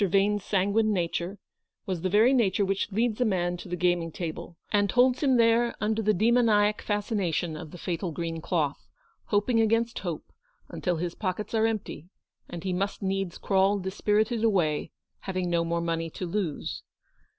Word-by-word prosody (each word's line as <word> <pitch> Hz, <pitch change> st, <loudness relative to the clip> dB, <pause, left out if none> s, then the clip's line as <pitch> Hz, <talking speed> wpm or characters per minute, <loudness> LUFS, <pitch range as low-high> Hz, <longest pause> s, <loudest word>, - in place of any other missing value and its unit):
Vane's 200 Hz, +1 st, +2 dB
sanguine 205 Hz, +2 st, +1 dB
nature, 175 Hz, 0 st, -2 dB, 0.5 s
was 185 Hz, -4 st, -3 dB
the 185 Hz, -, 0 dB
very 220 Hz, +7 st, +5 dB
nature 205 Hz, -5 st, +2 dB
which 195 Hz, +2 st, -1 dB
leads 225 Hz, +3 st, 0 dB
a -, -, +6 dB
man 180 Hz, -5 st, 0 dB
to 175 Hz, -, -10 dB
the 180 Hz, -, -2 dB
gaming 175 Hz, -2 st, +1 dB
table, 170 Hz, 0 st, -6 dB
and 205 Hz, -1 st, +2 dB
holds 250 Hz, +1 st, +3 dB
him 265 Hz, -4 st, +3 dB
there 230 Hz, +1 st, +3 dB
under 220 Hz, +1 st, 0 dB
the 215 Hz, 0 st, +3 dB
demoniac 215 Hz, 0 st, +3 dB
fascination 200 Hz, -6 st, -1 dB
of 155 Hz, 0 st, -8 dB
the 175 Hz, -, -10 dB
fatal 175 Hz, +1 st, -3 dB
green 165 Hz, 0 st, -4 dB
cloth, 150 Hz, -5 st, -1 dB, 0.4 s
hoping 215 Hz, +3 st, +1 dB
against 230 Hz, +1 st, +1 dB
hope, 170 Hz, -5 st, -6 dB, 0.4 s
until 180 Hz, -2 st, -2 dB
his 170 Hz, +1 st, -3 dB
pockets 200 Hz, +2 st, -4 dB
are 225 Hz, 0 st, +3 dB
empty, 205 Hz, -6 st, -4 dB, 0.4 s
and 175 Hz, -1 st, -7 dB
he 185 Hz, -1 st, -1 dB
must 200 Hz, +3 st, -2 dB
needs 195 Hz, -2 st, -2 dB
crawl 195 Hz, +1 st, +2 dB
dispirited 210 Hz, +4 st, 0 dB
away, 175 Hz, -9 st, +1 dB, 0.3 s
having 185 Hz, -2 st, -3 dB
no 170 Hz, -1 st, +2 dB
more 170 Hz, 0 st, -1 dB
money 165 Hz, -1 st, -2 dB
to 180 Hz, -, -6 dB
lose. 175 Hz, -4 st, -3 dB
195 Hz, 170 wpm, -27 LUFS, 175-215 Hz, 0.5 s, a